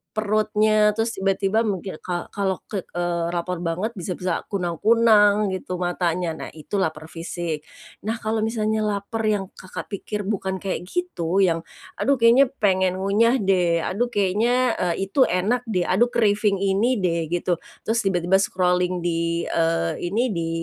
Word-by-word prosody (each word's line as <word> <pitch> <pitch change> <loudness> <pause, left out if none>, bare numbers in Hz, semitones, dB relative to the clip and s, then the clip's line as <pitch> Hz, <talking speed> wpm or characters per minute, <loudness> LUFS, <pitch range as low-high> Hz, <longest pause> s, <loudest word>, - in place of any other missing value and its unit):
perutnya. 215 0 +2
Terus 225 +1 0
tiba-tiba 195 +2 +1
mungkin 190 -4 -4
ka 175 -1 -5
kalo 195 -2 -2
ke 195 -4 -4
eee, 175 -1 -2
laper 175 0 -2
banget 175 +6 -2
bisa 180 +1 -3
bisa 180 -1 -3
kunang-kunang 205 +2 +3
gitu 185 -1 -4
matanya, 175 -1 -1
nah 160 - -7
itu 160 +6 -4
laper 160 -3 -3
fisik. 165 -2 -5 0.4
Nah, 220 - 0
kalau 220 +1 0
misalnya 220 0 0
lapar 210 +1 -2
yang 205 -3 -1
Kakak 185 - -9
pikir 205 +1 -4
bukan 190 -1 -2
kayak 185 -2 -3
gitu, 195 - 0
yang, 165 -3 +2 0.4
"Aduh, 280 - +3
kayaknya 240 +3 +5 0.2
pengen 190 -2 +3
ngunyah 205 +6 +2
deh, 175 -4 +2
aduh 230 +6 0
kayaknya 235 +4 +2 0.2
e - - -2
itu 255 +7 +3
enak 225 +8 0
deh, 185 -5 0
aduh 200 +8 +3
craving 210 -3 +2
ini 200 +6 +2
deh," 170 -4 0
gitu. 175 +1 -1 0.2
Terus 225 +1 0
tiba-tiba 190 -2 +2
scrolling 180 -2 +1
di, 170 0 0
eee, 165 0 +1
ini, 200 +7 0
di, 170 -3 -2
190 Hz, 155 wpm, -23 LUFS, 175-215 Hz, 0.4 s, kayaknya